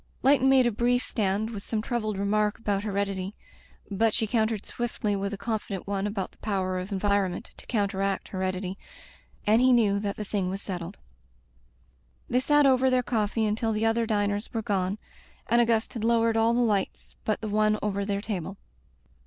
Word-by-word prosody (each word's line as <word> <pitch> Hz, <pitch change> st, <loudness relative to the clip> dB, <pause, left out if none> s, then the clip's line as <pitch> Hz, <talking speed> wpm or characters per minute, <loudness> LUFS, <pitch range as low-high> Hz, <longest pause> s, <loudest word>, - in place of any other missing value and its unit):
Leighton 270 Hz, -1 st, +5 dB
made 265 Hz, -2 st, +5 dB
a 240 Hz, -, +3 dB
brief 245 Hz, +3 st, +1 dB
stand 210 Hz, +1 st, -1 dB
with 200 Hz, -3 st, -6 dB
some 220 Hz, -, -2 dB
troubled 215 Hz, -2 st, -2 dB
remark 210 Hz, +1 st, +1 dB
about 205 Hz, -3 st, -1 dB
heredity, 200 Hz, -1 st, -2 dB, 0.6 s
but 220 Hz, +2 st, +2 dB
she 225 Hz, -, +1 dB
countered 220 Hz, -1 st, 0 dB
swifdy 230 Hz, -3 st, -2 dB
with 200 Hz, 0 st, -2 dB
a 205 Hz, -, -4 dB
confident 210 Hz, -3 st, -3 dB
one 200 Hz, 0 st, -1 dB
about 200 Hz, -2 st, -3 dB
the -, -, -28 dB
power 185 Hz, -3 st, -1 dB
of 185 Hz, +3 st, -6 dB
environment 200 Hz, 0 st, 0 dB
to -, -, -15 dB
counteract 195 Hz, -3 st, -1 dB
heredity, 185 Hz, 0 st, -3 dB, 0.7 s
and 220 Hz, +3 st, +4 dB
he 255 Hz, 0 st, +5 dB
knew 210 Hz, -5 st, +4 dB
that 200 Hz, -1 st, -2 dB
the 210 Hz, -, -4 dB
thing 195 Hz, -2 st, -1 dB
was 195 Hz, +1 st, -3 dB
setded. 180 Hz, -1 st, -5 dB, 1.3 s
They 250 Hz, -, +2 dB
sat 295 Hz, +2 st, +4 dB
over 260 Hz, -1 st, +4 dB
their 255 Hz, -1 st, +2 dB
coffee 220 Hz, -2 st, 0 dB
until 220 Hz, +1 st, 0 dB
the 215 Hz, +1 st, 0 dB
other 225 Hz, 0 st, +2 dB
diners 205 Hz, 0 st, 0 dB
were 225 Hz, -1 st, -2 dB
gone, 195 Hz, -1 st, 0 dB, 0.5 s
and 235 Hz, +1 st, +4 dB
Auguste 230 Hz, -1 st, +1 dB
had 225 Hz, -, -4 dB
lowered 230 Hz, 0 st, +3 dB
all 225 Hz, +1 st, +3 dB
the 245 Hz, -, +2 dB
lights 205 Hz, -5 st, -1 dB
but 215 Hz, -, 0 dB
the 220 Hz, -, -3 dB
one 215 Hz, 0 st, +2 dB
over 200 Hz, -1 st, -1 dB
their 200 Hz, 0 st, -1 dB
table. 195 Hz, -3 st, -4 dB
210 Hz, 185 wpm, -27 LUFS, 200-230 Hz, 1.3 s, Leighton